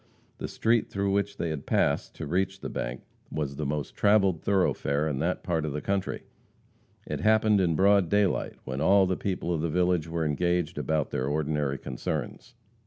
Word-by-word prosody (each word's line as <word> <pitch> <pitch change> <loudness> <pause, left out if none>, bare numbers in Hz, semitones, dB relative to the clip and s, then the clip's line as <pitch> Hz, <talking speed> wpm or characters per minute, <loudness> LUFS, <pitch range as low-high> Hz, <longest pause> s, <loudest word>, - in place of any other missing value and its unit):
The - - -3
street 115 0 +1
through 100 0 -1
which 100 +1 0
they 80 -2 -1
passed 70 - 0
to - - -5
reach 95 +4 -1
the - - -5
bank - - -4 0.3
was 70 -3 -3
the 75 0 -3
most 75 0 -3
traveled 100 -5 +3
thoroughfare 80 -6 +1
in 70 -4 -2
that 85 +5 -1
part 80 -3 0
of 75 -2 -3
the 75 - -2
country. 100 -1 -2 0.8
It - - -4
happened 110 -2 +4
in 85 -3 +2
broad 100 0 +4
daylight, 105 -2 +1
when 65 +1 -4
all 95 +4 +5
the 95 0 0
people 90 -3 -2
of 80 - -1
the 85 - -1
village 90 -1 +1
were 80 0 -2
engaged 85 +1 0
about 75 0 -1
their 65 - -1
ordinary 75 -1 -1
concerns. 70 - -5
85 Hz, 180 wpm, -27 LUFS, 75-100 Hz, 0.8 s, all